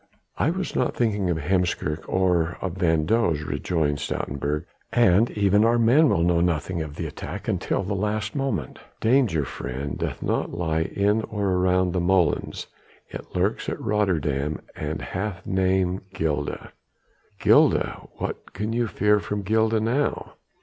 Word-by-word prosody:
"I - - +3
was 185 +1 -3
not 125 - 0
thinking 105 -6 +1
of 85 - +1
Heemskerk 85 -2 -1
or 90 -3 +1
of 95 -3 -3
van 80 -4 +2
Does," 85 -7 +1
rejoined 75 -3 -1
Stoutenburg, 70 +3 -2 0.3
"and 115 -1 +4
even 100 +1 +4
our 115 +1 +4
men 130 +7 +5
will 85 - +2
know 85 -1 +3
nothing 85 0 0
of 75 -2 -6
the - - -4
attack - - -7
until - - 0
the 100 +2 -2
last 105 +4 -2
moment. 115 - -2 0.2
Danger, 110 - +2
friend, 65 +3 -5
doth - - -3
not - - -1
lie 80 -2 0
in 105 +2 +2
or 100 -2 -1
around 90 0 +2
the 90 - 0
molens; 90 -1 +1 0.4
it - - -9
lurks 95 +5 0
at - - -4
Rotterdam 80 -9 0
and 75 0 -4
hath 95 -1 -4
name 95 0 +1
Gilda." 75 -2 -2 0.7
"Gilda! - - +3
What - - -6
can 105 +3 -3
you 120 0 +1
fear 105 0 +2
from 105 0 -4
Gilda 110 +2 +2
now?" 125 +7 -1
95 Hz, 150 wpm, -24 LUFS, 80-105 Hz, 0.7 s, men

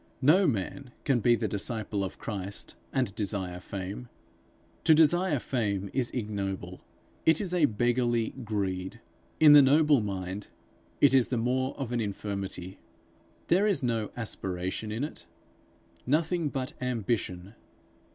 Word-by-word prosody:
No 175 +7 +5
man 120 +3 -3
can 135 -4 +2
be 120 +2 +4
the 110 -1 -1
disciple 105 0 -2
of 95 - -5
Christ 100 -2 -4 0.2
and 125 -7 0
desire 95 -4 -3
fame. 100 +6 -6 0.7
To 160 - +6
desire 165 +1 +4
fame 100 -6 -2
is 125 -2 0
ignoble; 95 -5 -4 0.4
it 160 -1 +4
is 185 -4 -2
a 175 -4 +4
beggarly 120 -1 +1
greed. 95 -4 -3 0.4
In 150 -2 +9
the 145 - +10
noble 145 0 +5
mind, 95 -1 -4 0.5
it 140 - +6
is 130 -3 +5
the 125 - -1
more 130 +3 0
of 130 -4 -3
an 120 -1 0
infirmity. 100 -3 -5 0.7
There 195 +5 +3
is 200 -9 +1
no 115 -3 0
aspiration 95 -2 -3
in 115 +5 -2
it 150 - -7 0.8
nothing 160 +3 +1
but 130 -2 -4
ambition. 105 -6 -2
115 Hz, 135 wpm, -29 LUFS, 100-135 Hz, 0.8 s, the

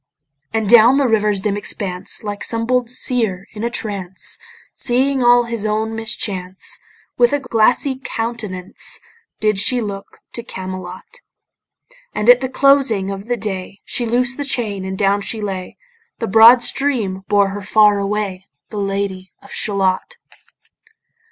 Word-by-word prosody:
And 220 -2 -1
down 235 +4 +7
the 280 -2 +2
river's 210 -3 +1
dim 200 0 0
expanse 190 -2 -1
Like 205 -1 -5
some 230 0 0
bold 250 0 +1
seër 230 -6 0
in 215 0 -6
a 235 - 0
trance, 195 -5 -4 0.3
Seeing 265 +2 +1
all 240 0 +5
his 235 -3 -3
own 220 +1 -1
mischance 195 -4 -2 0.4
With 240 +2 +4
a 290 - +2
glassy 255 +2 +1
countenance 215 -6 -4 0.4
Did 215 -2 +1
she 245 +5 +2
look 200 -3 -6 0.2
to 235 - -4
Camelot. 185 -4 -8 0.9
And 210 +3 +6
at 245 +1 +4
the 260 - -2
closing 260 -8 +3
of 195 +2 -7
the 245 0 -1
day 195 -2 -5
She 240 - -1
loosed 245 +2 +1
the 290 - -2
chain, 215 -8 -2
and 190 0 -4
down 200 0 +2
she 220 +3 -2
lay; 190 -3 -5 0.4
The 230 - -3
broad 225 +4 +7
stream 230 -9 +1
bore 205 -2 +3
her 205 +1 -6
far 210 0 +4
away, 200 -2 -3 0.2
The 210 - -5
Lady 195 -1 -3
of - - -12
Shalott. 200 - -1
215 Hz, 150 wpm, -18 LUFS, 195-240 Hz, 0.9 s, down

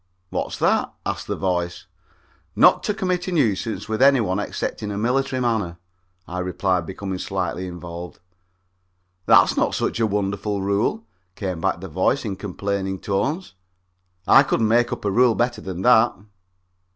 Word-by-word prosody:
"What's - - -3
that?" - - +1
asks - - -3
the - - -3
voice. 90 -2 -2 0.7
"Not - - +6
to 210 - +1
commit 185 -3 -1
a - - -2
nuisance 115 - 0
with 110 +2 -2
any 135 -1 +6
one 100 -3 0
except 105 - -4
in 105 - -4
a 100 - -4
military 130 +4 0
manner," 110 -9 -1 0.5
I 90 +1 -4
replied, 90 -1 -1
becoming 95 -1 -5
slightly 95 -1 -3
involved. 85 0 -8 1.1
"That's - - +6
not - - +1
such - - -1
a 115 - +3
wonderful 100 0 -2
rule," 100 - 0 0.3
came 90 -4 -4
back 85 - 0
the 95 - -6
voice 95 - 0
in 100 -3 -3
complaining 100 0 -3
tones. 135 - -2 0.7
"I 135 - +7
could 135 - 0
make 120 +2 +3
up - - -5
a 100 - +1
rule 120 +1 +4
better 120 0 0
than 95 -1 -5
that." 120 0 +5
100 Hz, 160 wpm, -22 LUFS, 95-120 Hz, 1.1 s, I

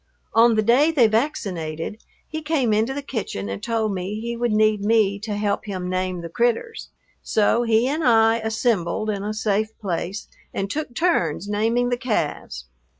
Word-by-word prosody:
On 230 0 +5
the 215 - +2
day 250 +8 +4
they 290 -8 +4
vaccinated 205 - -2 0.2
he 315 0 -5
came 295 -8 +1
into 220 +4 +1
the 280 +1 -4
kitchen 200 - -4
and 100 - -5
told 220 -3 -1
me 190 +3 -4
he 235 +1 -4
would 240 0 -1
need 215 -1 +3
me 205 -2 +2
to 210 0 -4
help 205 0 -1
him 185 -3 -4
name 185 -1 -2
the 170 - -6
"critters." 240 - -1 0.3
So 220 +2 +2
he 230 +1 +2
and 305 +4 -1
I 225 -2 +4
"assembled" 220 -2 0
in 200 -2 -3
a 210 - -2
safe 215 0 -1
place 190 0 -4 0.3
and 195 0 -2
took 295 -5 -4
turns 200 - +1
naming 225 +4 +1
the 245 - 0
calves. 165 - -3
220 Hz, 175 wpm, -23 LUFS, 200-240 Hz, 0.3 s, On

